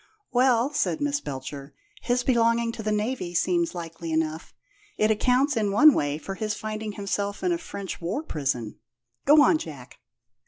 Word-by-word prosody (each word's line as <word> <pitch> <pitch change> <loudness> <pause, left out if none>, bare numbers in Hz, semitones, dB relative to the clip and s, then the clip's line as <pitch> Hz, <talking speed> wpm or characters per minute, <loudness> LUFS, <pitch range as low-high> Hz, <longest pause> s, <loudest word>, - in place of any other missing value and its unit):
"Well," 255 +1 +3
said 295 +2 0
Miss 290 -1 0
Belcher, 140 - -7 0.3
"his 245 0 0
belonging 230 -2 +2
to 230 - -7
the 215 0 -1
Navy 210 -4 -2
seems 170 0 +1
likely 165 -1 -6
enough. 160 +1 -2 0.5
It 215 +1 +3
accounts, 255 +6 +2
in 210 -3 0
one 300 +9 +7
way, 145 -5 0
for 195 +5 -6
his 215 +1 -3
finding 215 0 -5
himself 200 0 -3
in 360 - +2
a 340 - 0
French 200 - -7
war 190 - -2
prison. 135 - -3 0.5
Go 295 +1 +7
on, 310 - +4
Jack." 140 - -10
210 Hz, 165 wpm, -26 LUFS, 165-250 Hz, 0.5 s, one